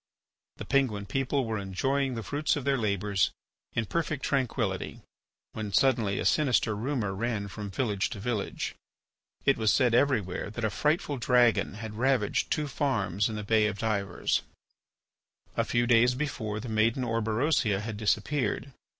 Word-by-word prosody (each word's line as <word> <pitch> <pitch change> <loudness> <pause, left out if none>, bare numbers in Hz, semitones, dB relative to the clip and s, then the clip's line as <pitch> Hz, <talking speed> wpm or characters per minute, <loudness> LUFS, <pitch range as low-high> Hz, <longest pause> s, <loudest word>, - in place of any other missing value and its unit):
The - - -6
Penguin 115 -8 +1
people 135 +5 0
were 110 -2 -2
enjoying 130 +8 -1
the 115 - -4
fruit 145 +9 0
of 145 -3 -4
their 140 -1 +3
labours 100 -5 +1 0.4
in 115 - 0
perfect 155 +2 -2
tranquillity 130 -4 -1 0.5
when 110 -2 -4
suddenly 115 -4 +2
a - - -2
sinister 125 -7 +2
rumour 115 -3 -2
ran 105 0 -2
from 100 +1 -6
village 100 -1 -1
to 100 - -7
village. 110 -1 -3 0.7
It 135 - +4
was 110 -2 +3
said 125 -4 +3
everywhere 115 -9 +1
that 110 +2 -3
a 110 - 0
frightful 150 - 0
dragon 120 -4 +3
had 110 0 -7
ravaged 130 -5 +1
two 150 -1 0
farms 105 - 0
in 110 - -4
the 105 - -4
Bay 110 0 +3
of 100 -1 -3
Divers. 100 -4 0 1.1
A - - +2
few 120 0 +1
days 120 +1 +4
before, 120 -7 -3
the 125 - -7
maiden 110 +3 +1
Orberosia 115 -1 +1
had 110 -1 -5
disappeared. 135 +5 0
115 Hz, 155 wpm, -28 LUFS, 105-135 Hz, 1.1 s, It